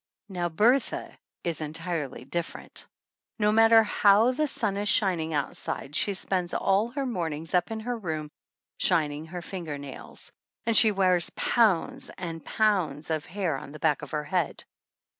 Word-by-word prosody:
Now, 175 Hz, -2 st, -2 dB
Bertha 230 Hz, +11 st, +1 dB, 0.3 s
is 165 Hz, -3 st, -1 dB
entirely 155 Hz, -4 st, -4 dB
different! 170 Hz, +5 st, -5 dB, 0.5 s
No 210 Hz, -1 st, +3 dB
mat 225 Hz, +1 st, +5 dB
ter 225 Hz, -1 st, +7 dB
how 210 Hz, +3 st, +4 dB
the 305 Hz, +4 st, 0 dB
sun 215 Hz, -7 st, -1 dB
is 205 Hz, +1 st, 0 dB
shining 180 Hz, -5 st, +2 dB
outside 145 Hz, -1 st, -3 dB
she 200 Hz, +3 st, +2 dB
spends 185 Hz, -2 st, -1 dB
all 195 Hz, +3 st, +2 dB
her 275 Hz, +2 st, -3 dB
mornings 165 Hz, -, -3 dB
up 180 Hz, -1 st, +2 dB
in 220 Hz, 0 st, -4 dB
her 245 Hz, +2 st, -2 dB
room 160 Hz, -8 st, -4 dB, 0.5 s
shining 155 Hz, -3 st, +1 dB
her 175 Hz, +1 st, -7 dB
finger 170 Hz, -7 st, -5 dB
nails; 140 Hz, -2 st, -8 dB, 0.3 s
and 230 Hz, -1 st, +2 dB
she 215 Hz, 0 st, +7 dB
wears 185 Hz, -3 st, +3 dB
pounds 240 Hz, +4 st, +2 dB
and 165 Hz, -3 st, -6 dB
pounds 170 Hz, -9 st, 0 dB
of 155 Hz, -2 st, -2 dB
hair 180 Hz, -5 st, -1 dB
on 140 Hz, -, -10 dB
the 155 Hz, -, -9 dB
back 155 Hz, -3 st, +1 dB
of 145 Hz, -, -8 dB
her 150 Hz, -1 st, -2 dB
head. 175 Hz, 0 st, -1 dB
180 Hz, 160 wpm, -27 LUFS, 160-210 Hz, 0.5 s, ter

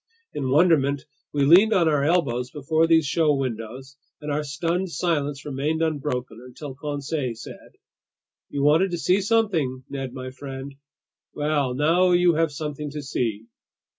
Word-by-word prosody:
In 135 Hz, -2 st, -2 dB
wonderment, 145 Hz, -2 st, +3 dB, 0.3 s
we 140 Hz, -1 st, +1 dB
leaned 190 Hz, +9 st, +6 dB
on 175 Hz, -4 st, +3 dB
our 150 Hz, -3 st, +2 dB
elbows 140 Hz, -7 st, +1 dB
before 155 Hz, +4 st, +1 dB
these 165 Hz, -2 st, +4 dB
show 155 Hz, 0 st, +2 dB
windows, 130 Hz, +1 st, -5 dB, 0.2 s
and 150 Hz, -1 st, -5 dB
our 150 Hz, +1 st, -1 dB
stunned 170 Hz, +6 st, -2 dB
silence 145 Hz, -3 st, -1 dB
remained 150 Hz, +3 st, -1 dB
unbroken 135 Hz, -7 st, -2 dB
until 130 Hz, +3 st, -9 dB
Conseil 140 Hz, -2 st, -3 dB
said: -, -, -12 dB, 0.7 s
"You 140 Hz, -, -2 dB
wanted 160 Hz, +6 st, +4 dB
to 175 Hz, -, -3 dB
see 185 Hz, +4 st, +2 dB
something, 190 Hz, -, 0 dB
Ned 135 Hz, -2 st, -4 dB
my 130 Hz, 0 st, -7 dB
friend; 135 Hz, +1 st, -8 dB, 0.6 s
well, 145 Hz, -4 st, 0 dB
now 170 Hz, +6 st, +3 dB
you 175 Hz, -1 st, +4 dB
have 160 Hz, 0 st, +1 dB
something 150 Hz, 0 st, -5 dB
to 145 Hz, 0 st, -6 dB
see!" 115 Hz, -5 st, -2 dB
145 Hz, 150 wpm, -24 LUFS, 135-165 Hz, 0.7 s, leaned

